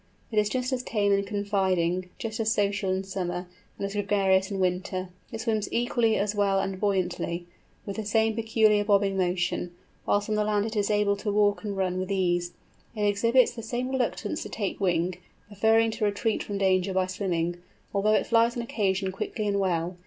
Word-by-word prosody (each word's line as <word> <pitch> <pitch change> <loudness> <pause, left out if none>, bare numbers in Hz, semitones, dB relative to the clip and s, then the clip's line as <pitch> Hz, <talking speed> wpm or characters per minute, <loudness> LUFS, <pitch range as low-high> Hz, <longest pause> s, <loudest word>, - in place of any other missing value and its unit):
It 215 - +2
is 210 0 +2
just 255 +2 -1
as 255 - 0
tame 205 -4 0
and 200 0 +2
confiding, 190 -4 0
just 220 -1 -5
as 220 -1 +1
social 200 -2 0
in 190 +1 -1
summer, 180 -2 -4 0.3
and - - -3
as 200 - -4
gregarious 195 -2 +2
in 195 -2 -3
winter. 185 0 -1 0.2
It 225 -2 -5
swims 220 -3 -1
equally 235 -2 +2
as 205 +1 0
well 200 -2 +2
and 190 -1 -3
buoyantly, 180 -3 -1 0.4
with 200 0 -5
the 220 - -3
same 220 +1 +2
peculiar 220 -2 +3
bobbing 200 -1 +2
motion; 180 -1 -1 0.3
whilst 205 0 +2
on 215 - -1
the 210 0 +2
land 210 -1 +1
it 225 0 -4
is 205 -1 +1
able 205 -1 +2
to 210 - -3
run 205 0 +3
and 205 -2 -4
walk 185 -1 0
with 185 +1 -3
ease. 175 -2 0 0.4
It 210 -1 0
exhibits 230 +5 +3
the 235 - -7
same 240 +3 -3
reluctance 265 -1 -1
to - - -6
take 200 -3 -3
wing, 180 -2 0 0.3
preferring 220 +2 +3
to 215 0 -1
retreat 210 +2 0
from 205 - -4
danger 190 -1 +2
by 185 -1 +3
swimming, 175 -2 -2 0.4
although 210 +2 +2
it - - +2
flies 230 +1 +3
on 235 - -2
occasion 195 -4 0
quickly 210 +2 -3
and 200 -1 +1
well. 175 -2 -1
200 Hz, 195 wpm, -27 LUFS, 185-215 Hz, 0.4 s, peculiar